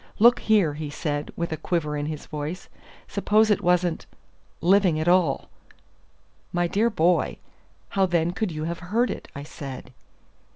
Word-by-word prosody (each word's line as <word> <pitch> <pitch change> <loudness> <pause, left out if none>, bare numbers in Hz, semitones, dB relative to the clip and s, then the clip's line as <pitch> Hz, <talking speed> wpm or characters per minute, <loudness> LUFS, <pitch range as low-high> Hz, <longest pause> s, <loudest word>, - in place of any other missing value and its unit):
"Look 240 +3 +6
here," 205 -9 +3
he 150 0 -5
said, 145 0 -3
with 170 -1 -3
a 160 - -2
quiver 155 -2 -1
in 145 0 -2
his 155 -1 -5
voice; 155 +3 -6 0.4
"suppose 215 +1 +2
it 205 - +2
wasn't 180 -2 +1 0.5
living 180 -2 +3
at 155 - -2
all!" 175 -6 +3 1.0
"My 175 0 +1
dear 210 +7 +2
boy, 175 -3 +1 0.5
how 195 -1 +2
then 170 -1 +1
could 195 +1 -2
you 155 -1 -4
have 170 +1 -3
heard 220 +8 0
it?" - - -7
I 140 - -6
said. 135 -3 -8
170 Hz, 160 wpm, -25 LUFS, 155-190 Hz, 1.0 s, Look